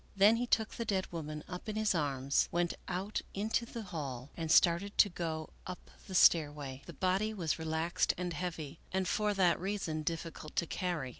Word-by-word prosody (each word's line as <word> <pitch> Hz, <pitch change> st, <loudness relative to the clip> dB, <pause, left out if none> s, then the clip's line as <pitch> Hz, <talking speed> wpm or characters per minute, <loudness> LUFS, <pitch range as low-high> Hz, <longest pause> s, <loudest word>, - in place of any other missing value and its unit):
Then 205 Hz, +3 st, +6 dB
he 245 Hz, +1 st, -1 dB
took 220 Hz, -2 st, +2 dB
the 235 Hz, -, -3 dB
dead 195 Hz, -4 st, -1 dB
woman 155 Hz, -3 st, -5 dB
up 180 Hz, +4 st, -6 dB
in 215 Hz, -, -3 dB
his 215 Hz, -1 st, +2 dB
arms, 140 Hz, -4 st, +1 dB
went 175 Hz, 0 st, +1 dB
out 190 Hz, +3 st, -2 dB
into 220 Hz, +3 st, 0 dB
the 230 Hz, -1 st, -6 dB
hall, 140 Hz, -, -5 dB
and 165 Hz, -2 st, -2 dB
started 180 Hz, +5 st, +4 dB
to 205 Hz, -, +7 dB
go 160 Hz, -3 st, -4 dB, 0.2 s
up 180 Hz, -1 st, -8 dB, 0.2 s
the 190 Hz, -, -5 dB
stairway. 145 Hz, -6 st, +4 dB
The 170 Hz, -, -8 dB
body 190 Hz, +7 st, 0 dB
was 165 Hz, -5 st, -1 dB
re 160 Hz, -, -4 dB
laxed 160 Hz, +2 st, +1 dB
and 180 Hz, -1 st, -2 dB
heavy, 165 Hz, -4 st, -4 dB
and 190 Hz, 0 st, 0 dB
for 210 Hz, +1 st, +1 dB
that 180 Hz, -3 st, +3 dB
reason 190 Hz, -5 st, -2 dB
difficult 165 Hz, 0 st, -5 dB
to -, -, +2 dB
carry. 170 Hz, -6 st, -2 dB
175 Hz, 195 wpm, -33 LUFS, 155-195 Hz, 0.2 s, to